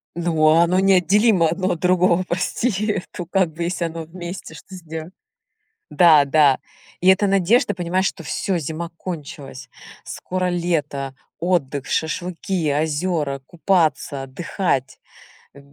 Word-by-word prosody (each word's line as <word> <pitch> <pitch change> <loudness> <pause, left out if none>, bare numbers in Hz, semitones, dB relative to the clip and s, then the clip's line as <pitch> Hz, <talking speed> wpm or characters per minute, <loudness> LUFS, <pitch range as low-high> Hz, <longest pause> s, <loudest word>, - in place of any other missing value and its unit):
Ну, 165 -2 +1
а 160 +2 +6
оно 180 +2 +2
неотделимо 195 0 +4
одно 185 +4 -1
от 175 - -3
другого, 180 0 +3
прости, 210 +4 -1
э, - - -2
то 175 - -6
как 185 -1 +1
бы 165 +2 -5
если 170 0 -2
оно 165 0 -5
вместе, 175 +3 -8
что 190 - -12
сдела 160 -2 -7 0.8
Да, 155 -1 +6
да. 140 -2 +4 0.4
И 180 - +2
это 190 +2 +5
надежда, 195 +6 +2
понимаешь, 185 +2 -1
что 180 - -3
всё: 185 +4 -2
зима 165 +2 -5
кончилась, 145 -7 -8 0.4
скоро 185 0 -3
лето, 160 -6 -2 0.2
отдых, 145 -6 -1
шашлыки, 170 +1 -2
озёра, 150 -1 -1
купаться, 160 -5 0
отдыхать. 135 0 -2 0.6
В - - -13
170 Hz, 135 wpm, -21 LUFS, 155-185 Hz, 0.8 s, а